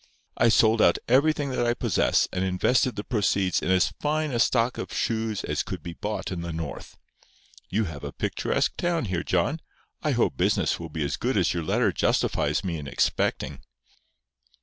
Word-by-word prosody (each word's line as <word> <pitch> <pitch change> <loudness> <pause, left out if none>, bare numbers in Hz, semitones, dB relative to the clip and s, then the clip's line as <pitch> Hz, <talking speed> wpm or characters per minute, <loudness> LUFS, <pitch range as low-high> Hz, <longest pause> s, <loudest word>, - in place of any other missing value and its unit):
I 120 - +4
sold 110 0 +4
out 85 - +5
everything 140 +2 +3
that 125 - 0
I 120 0 +1
possess, - - +2
and 90 - -1
invested 110 +7 +1
the 105 - -4
proceeds 100 -5 +1
in - - -2
as 95 0 +3
fine 155 0 0
a 120 - -1
stock 120 0 +2
of - - -5
shoes 110 -3 -1
as - - -1
could - - -6
be 85 - -6
bought 105 +4 -4
in 90 -2 -3
the 85 0 -4
North. 80 -4 -6 0.7
You 110 +3 +1
have 80 -6 -6
a 70 - -5
picturesque - - -1
town 170 -5 0
here, 90 -4 -2
John. 95 - 0 0.4
I - - 0
hope - - +1
business - - +1
will 85 -1 -7
be 75 -1 -3
as 70 - -2
good 125 -2 -1
as 95 - +2
your 85 - -2
letter 80 - +1
justifies - - +1
me 85 -4 -3
in 70 - -7
expecting." - - -1
105 Hz, 190 wpm, -26 LUFS, 85-120 Hz, 0.7 s, out